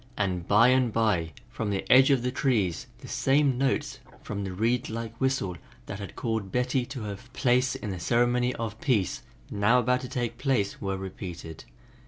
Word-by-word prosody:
And 90 Hz, -4 st, -1 dB
by 115 Hz, +4 st, +6 dB
and 130 Hz, -2 st, +3 dB
by, 105 Hz, -8 st, +1 dB, 0.2 s
from 110 Hz, -, -4 dB
the 100 Hz, -1 st, -2 dB
edge 130 Hz, +2 st, +7 dB
of 135 Hz, -4 st, +3 dB
the 125 Hz, -, 0 dB
trees, 110 Hz, -, 0 dB
the -, -, -10 dB
same 135 Hz, -2 st, +2 dB
notes 135 Hz, 0 st, 0 dB, 0.2 s
from 100 Hz, -1 st, -4 dB
the 95 Hz, -, -4 dB
reed 115 Hz, +6 st, 0 dB
like 115 Hz, 0 st, -5 dB
whistle 130 Hz, -9 st, 0 dB, 0.3 s
that 95 Hz, -, -6 dB
had 100 Hz, -, -8 dB
called 110 Hz, -5 st, -2 dB
Betty 125 Hz, 0 st, 0 dB
to 130 Hz, -3 st, -6 dB
her 100 Hz, -1 st, -5 dB
place 125 Hz, 0 st, +2 dB
in 105 Hz, -, -5 dB
the 95 Hz, -, -5 dB
ceremony 120 Hz, +5 st, +2 dB
of 110 Hz, -1 st, -5 dB
peace, 110 Hz, -, +1 dB, 0.3 s
now 105 Hz, +4 st, +3 dB
about 125 Hz, +1 st, +2 dB
to 125 Hz, -, -7 dB
take 120 Hz, -1 st, -3 dB
place, 130 Hz, -7 st, 0 dB
were 95 Hz, -1 st, -2 dB
repeated. 90 Hz, -4 st, -8 dB
115 Hz, 185 wpm, -27 LUFS, 100-125 Hz, 0.3 s, edge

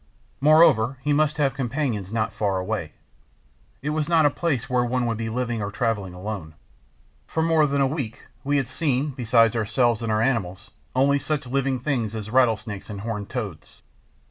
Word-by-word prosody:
Moreover, 135 Hz, -5 st, +5 dB
he 150 Hz, -, +2 dB
must 150 Hz, 0 st, +2 dB
have 140 Hz, -3 st, +2 dB
companions 125 Hz, -6 st, -2 dB
not 110 Hz, -1 st, -1 dB
far 100 Hz, -3 st, 0 dB
away; 95 Hz, -4 st, -3 dB, 0.9 s
it 150 Hz, -, -1 dB
was 155 Hz, +1 st, -1 dB
not 165 Hz, -2 st, +4 dB
a 145 Hz, -, +4 dB
place 145 Hz, -7 st, -1 dB
where 125 Hz, -2 st, +1 dB
one 125 Hz, 0 st, 0 dB
would 115 Hz, -2 st, -1 dB
be 115 Hz, 0 st, -2 dB
living 120 Hz, -1 st, -2 dB
or 100 Hz, -, -2 dB
traveling 105 Hz, -6 st, -2 dB
alone. 90 Hz, -5 st, -6 dB, 0.7 s
For 160 Hz, -, -1 dB
more 160 Hz, -2 st, +4 dB
than 140 Hz, 0 st, 0 dB
a -, -, +4 dB
week 135 Hz, -5 st, -4 dB, 0.2 s
we 145 Hz, +1 st, +1 dB
had 135 Hz, -3 st, 0 dB
seen, 145 Hz, -2 st, -1 dB
besides 115 Hz, -3 st, +3 dB
ourselves 115 Hz, +1 st, +1 dB
and 115 Hz, -1 st, -2 dB
our 110 Hz, -, +2 dB
animals, 100 Hz, -6 st, -2 dB, 0.2 s
only 140 Hz, +2 st, +3 dB
such 145 Hz, 0 st, -2 dB
living 135 Hz, 0 st, 0 dB
things 120 Hz, -5 st, -2 dB
as 110 Hz, -1 st, -6 dB
rattlesnakes 115 Hz, -6 st, +1 dB
and 100 Hz, -2 st, -6 dB
horned 105 Hz, -2 st, -4 dB
toads. 100 Hz, -11 st, -6 dB
120 Hz, 180 wpm, -24 LUFS, 110-140 Hz, 0.9 s, Moreover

